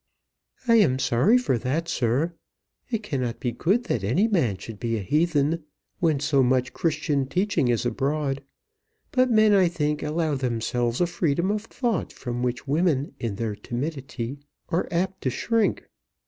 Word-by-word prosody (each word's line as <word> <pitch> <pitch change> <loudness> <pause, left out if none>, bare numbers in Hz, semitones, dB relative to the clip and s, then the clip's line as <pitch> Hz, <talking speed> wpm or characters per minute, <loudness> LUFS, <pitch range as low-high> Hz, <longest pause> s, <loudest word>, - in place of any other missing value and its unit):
"I 230 -1 +6
am 160 - +4
sorry 130 - +3
for 190 - 0
that, 150 +8 -1
sir. 135 +6 0 0.6
It 225 -3 -2
cannot 130 - -2
be 120 - -1
good 195 - +1
that 120 - -2
any 160 - +2
man 135 - +1
should 110 0 -9
be 115 -1 -1
a - - -3
heathen 155 - +1 0.4
when 160 -5 +2
so 145 -1 +2
much 125 0 +2
Christian 145 -4 0
teaching 180 -3 +1
is 120 0 +1
abroad. 140 +3 -1 0.7
But 255 0 +3
men 215 -2 +5
I 190 -3 +5
think 150 -3 -1
allow 155 0 0
themselves 120 -1 -1
a - - +5
freedom 170 +1 0
of 210 +1 -2
thought 235 -6 -2
from 120 -1 -5
which 125 +2 -2
women 150 -1 +1
in 115 -4 -3
their 110 0 -2
timidity 135 +1 -5 0.3
are 170 - 0
apt 185 +2 -1
to 130 - 0
shrink. 225 - 0
145 Hz, 160 wpm, -25 LUFS, 125-180 Hz, 0.7 s, I